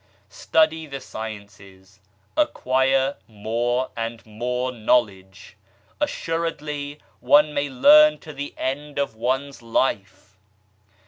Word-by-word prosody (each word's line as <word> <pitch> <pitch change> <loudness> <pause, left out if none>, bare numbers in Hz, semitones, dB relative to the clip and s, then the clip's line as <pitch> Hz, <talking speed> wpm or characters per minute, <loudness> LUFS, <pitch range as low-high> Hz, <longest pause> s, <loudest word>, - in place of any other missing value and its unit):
Study 160 +8 +1
the 135 -1 -6
sciences, 100 -4 -10 0.4
acquire 135 - +1
more 120 +4 -2
and 115 0 -5
more 125 +4 -3
knowledge. 105 -6 -1 0.4
Assuredly 150 -3 -3 0.2
one 145 +4 +4
may 145 0 -1
learn 300 - +6
to 155 - -10
the 145 +1 -7
end 145 +3 -4
of 140 -4 -1
one's 130 +4 -2
life 105 -4 -2
130 Hz, 95 wpm, -23 LUFS, 110-145 Hz, 0.4 s, learn